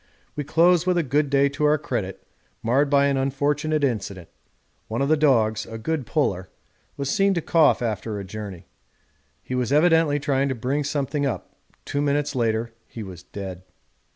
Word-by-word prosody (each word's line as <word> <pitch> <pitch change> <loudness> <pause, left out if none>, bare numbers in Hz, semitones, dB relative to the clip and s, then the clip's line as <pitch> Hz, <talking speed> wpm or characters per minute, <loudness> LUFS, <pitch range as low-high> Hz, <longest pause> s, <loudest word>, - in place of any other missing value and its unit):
We 150 - -2
close 170 +4 +3
with 180 -1 +3
a 170 - +2
good 145 +1 +1
day 140 0 +4
to 145 +2 -1
our 150 +1 +4
credit, 115 -10 -4 0.4
marred 135 +5 +2
by 140 0 +4
an 140 -1 +1
unfortunate 145 +3 0
incident 100 -9 -2 0.6
one 115 +2 -3
of 140 - +1
the 155 - +5
dogs, 110 -8 +2
a 115 - -7
good 140 +3 -3
puller, 95 - 0 0.5
was 140 - -3
seen 195 +4 +2
to - - +1
cough 155 -6 +3
after 110 -1 -3
a - - -5
journey; 95 -2 -8 0.8
he - - -6
was 125 -1 -1
evidently 160 -1 +4
trying 140 -1 0
to 130 - -1
bring 130 +5 -1
something 145 0 -1
up 130 - -5 0.3
two 145 - -2
minutes 145 0 0
later 115 -2 0
he 115 - -8
was 90 -3 -9
dead. 95 -2 -7
140 Hz, 180 wpm, -24 LUFS, 110-150 Hz, 0.8 s, the